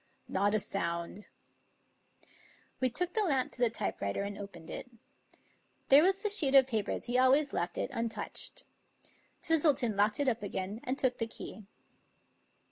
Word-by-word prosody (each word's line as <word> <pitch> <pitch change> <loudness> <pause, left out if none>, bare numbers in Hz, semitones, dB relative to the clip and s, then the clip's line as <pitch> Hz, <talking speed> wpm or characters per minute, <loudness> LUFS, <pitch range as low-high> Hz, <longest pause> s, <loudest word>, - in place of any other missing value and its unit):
" - - -40
" - - -41
Not 205 +1 +3
a - - +4
sound." 170 +1 -3 1.5
We 255 - +2
took 355 +9 -2
the 440 - +1
lamp 275 -10 +1
to 245 - -11
the 240 - +4
typewriter 200 - -3
and 200 0 -5
opened 195 -5 -10
it. 250 - -7 1.0
There 275 +2 +9
was 385 +4 +2
the 420 - +1
sheet 280 -9 +3
of 270 -1 +8
paper 220 -5 -2
as - - -3
he 250 +1 +1
always 275 +3 +4
left 175 +1 -2
it, - - -2
untouched, 230 -1 -2 0.8
Twistleton 290 -8 +2
locked 210 +4 +2
it 285 - +1
up 235 -2 +1
again 200 +1 -4
and 260 +2 -1
took 255 -3 0
the 230 - -1
key. 220 -2 -9
240 Hz, 170 wpm, -31 LUFS, 205-275 Hz, 1.5 s, There